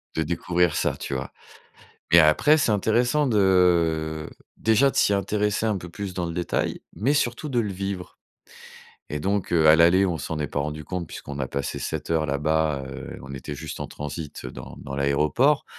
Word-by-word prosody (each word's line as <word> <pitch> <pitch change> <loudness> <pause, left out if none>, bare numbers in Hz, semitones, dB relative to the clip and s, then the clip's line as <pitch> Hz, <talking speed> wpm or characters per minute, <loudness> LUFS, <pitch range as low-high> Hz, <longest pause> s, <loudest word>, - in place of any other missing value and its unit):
de 80 - +1
découvrir 85 0 0
ça», - - 0
tu - - -5
vois? 65 0 -4 0.8
Et 85 - +8
après, 80 - +5
c'est 145 -7 +2
intéressant 120 +8 +2
de, 85 -7 +2 0.3
déjà, 110 +5 +4
de - - -8
s'y - - +3
intéresser 105 +2 0
un 105 -3 +1
peu 85 -1 -8
plus 100 0 -6
dans 90 -1 -2
le 85 - -4
détail, 85 0 -2
mais 130 +7 +1
surtout 145 +1 -1
de 120 -2 +1
le 105 -4 -2
vivre. 95 -1 -5 0.9
Et 75 - -3
donc, 100 0 -1
heu, 80 -2 +4
à 80 - +8
l'aller, 85 +4 +5
on 85 -4 -1
s'en 75 +2 -4
est 75 - -1
pas - - -3
rendu 75 +1 -3
compte 90 -3 -4
puisqu'on 70 -2 -8
a 65 - -1
passé 70 -2 -3
7 - - -4
heures 80 -2 +1
là-bas, 75 0 0
heu, 65 -1 -8
on 70 +1 -9
était 70 +2 -6
juste 75 +1 -7
en - - -3
transit, 75 +1 -7
heu, - - -5
dans - - -10
dans 70 -1 -7
l'aéroport, 75 - +2
85 Hz, 200 wpm, -24 LUFS, 75-100 Hz, 0.9 s, Et